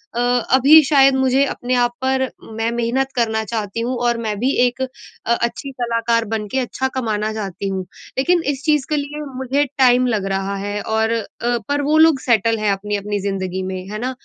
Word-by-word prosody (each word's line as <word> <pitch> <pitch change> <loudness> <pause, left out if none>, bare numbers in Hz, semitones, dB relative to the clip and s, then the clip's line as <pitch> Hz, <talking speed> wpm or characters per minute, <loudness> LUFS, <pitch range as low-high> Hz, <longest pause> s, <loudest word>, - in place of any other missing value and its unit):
अ, - - -1
अभी 255 +5 +5
शायद 275 -1 +5
मुझे 265 +1 +3
अपने 255 -2 -3
आप 245 -1 +2
पर 265 -1 +1 0.3
मैं 225 +1 0
मेहनत 240 +3 -1
करना 220 -2 0
चाहती 215 -1 -4
हूँ 250 +2 -2
और 235 -1 +2
मैं 215 -3 -3
भी 255 +4 +1
एक 245 +1 -2
अ, 260 - 0 0.5
अच्छी 235 +4 -2
कलाकार 235 -2 0
बनके 215 +3 -2
अच्छा 260 +1 -2
कमाना 220 -4 -1
चाहती 200 -2 -4
हूँ। 190 -1 -3 0.3
लेकिन 345 +6 +2
इस 280 0 -7
चीज़ 300 -4 +2
के 305 - +1
लिए 290 +1 -4 0.2
मुझे 265 +3 0
टाइम 255 -1 +4
लग 215 -5 -1
रहा 195 +1 -2
है 205 +1 -4
और 220 +1 0
अ, 230 - +1 0.5
पर 285 0 +1
वो 300 +2 +2
लोग 315 -3 +5
सेटल 230 -2 +2
हैं 210 -1 +1
अपनी-अपनी 205 +1 -2
ज़िंदगी 190 -2 -3
में, 185 0 -5
है 210 - -5
ना? 255 +2 -2
235 Hz, 195 wpm, -19 LUFS, 210-265 Hz, 0.5 s, अभी